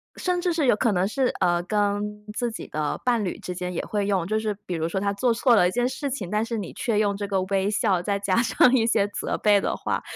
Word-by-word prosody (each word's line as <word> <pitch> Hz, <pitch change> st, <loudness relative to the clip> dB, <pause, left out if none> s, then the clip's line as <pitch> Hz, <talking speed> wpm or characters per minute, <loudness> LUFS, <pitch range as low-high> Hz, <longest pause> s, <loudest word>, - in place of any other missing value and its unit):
甚 360 Hz, -1 st, -1 dB
至 355 Hz, 0 st, +1 dB
是 325 Hz, -4 st, 0 dB
有 245 Hz, -, +4 dB
可 225 Hz, +2 st, +1 dB
能 180 Hz, +1 st, +1 dB
是， 260 Hz, +4 st, 0 dB
呃， 175 Hz, 0 st, +2 dB
跟 210 Hz, +1 st, -1 dB
自 240 Hz, -1 st, -1 dB
己 -, -, -7 dB
的 150 Hz, -1 st, -2 dB
伴 240 Hz, -3 st, +2 dB
侣 185 Hz, -, -3 dB
之 180 Hz, -, -6 dB
间 180 Hz, 0 st, -4 dB
也 175 Hz, -, -3 dB
会 205 Hz, -1 st, -1 dB
用。 190 Hz, -4 st, +1 dB
就 215 Hz, +4 st, 0 dB
是 220 Hz, -1 st, -1 dB
比 180 Hz, -, -4 dB
如 165 Hz, -1 st, -1 dB
说 190 Hz, -, -1 dB
他 200 Hz, 0 st, 0 dB
做 240 Hz, +4 st, +1 dB
错 240 Hz, +1 st, +3 dB
了 180 Hz, -, +5 dB
一 180 Hz, -, -1 dB
件 245 Hz, +3 st, +1 dB
事 270 Hz, +2 st, -4 dB
情， 225 Hz, -9 st, -4 dB
但 210 Hz, +1 st, +1 dB
是 230 Hz, 0 st, -3 dB
你 200 Hz, -5 st, -5 dB
却 225 Hz, -3 st, -1 dB
用 205 Hz, -1 st, +2 dB
这 205 Hz, 0 st, -4 dB
个 195 Hz, -1 st, 0 dB
微 195 Hz, +1 st, 0 dB
笑， 205 Hz, -4 st, +1 dB
再 200 Hz, +2 st, -1 dB
加 200 Hz, +1 st, +1 dB
上 250 Hz, +1 st, +4 dB
一 245 Hz, -4 st, +4 dB
些 210 Hz, -3 st, +2 dB
责 205 Hz, -, -3 dB
备 205 Hz, -2 st, +4 dB
的 -, -, -1 dB
话， -, -, -2 dB
205 Hz, 295 characters per minute, -24 LUFS, 190-235 Hz, -, 了